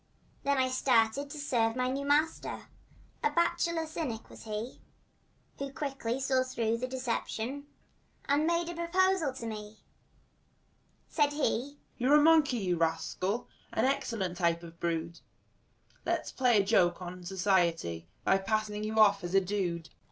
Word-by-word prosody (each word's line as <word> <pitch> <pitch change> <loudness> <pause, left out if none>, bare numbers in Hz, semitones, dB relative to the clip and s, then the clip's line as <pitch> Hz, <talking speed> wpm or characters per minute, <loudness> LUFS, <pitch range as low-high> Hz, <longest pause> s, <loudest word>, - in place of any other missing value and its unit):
Then 280 0 +1
I 260 -1 +3
started 255 +1 +2
to 300 - -7
serve 235 -6 +1
my 255 0 0
new 275 +2 -2
master— 300 +3 0 0.5
A 450 - +4
bachelor 335 -2 +1
cynic 305 -8 -5
was - - -12
he, 215 +3 -5 0.8
Who 275 0 -4
quickly 270 -4 -3
saw 265 -1 +2
through 230 -3 -1
the 255 - -2
deception 255 +1 -3 0.6
And 290 +3 +2
made 340 0 +1
a - - -4
proposal 345 -2 +2
to 240 - -6
me. 215 -1 -6 1.3
Said 290 -2 +1
he: 285 -1 -1 0.2
"You're 260 +4 +4
a - - +8
monkey, 310 -5 +5
you 180 -5 0
rascal, 165 +6 -1 0.2
And 220 - +1
an 265 - +5
excellent 220 -10 -3
type 170 -1 +1
of 170 - -9
the 170 - -26
brood; 170 0 -2 0.8
Let's - - -1
play 250 -3 +3
a - - +6
good - - -3
joke 185 -4 +3
on 180 0 -7
society 175 - 0 0.2
By 195 - +3
passing 210 +1 -1
you 215 +1 -3
off 200 -2 +5
as 175 +2 -3
a - - +8
dude." 180 -4 -2
230 Hz, 160 wpm, -31 LUFS, 195-280 Hz, 1.3 s, a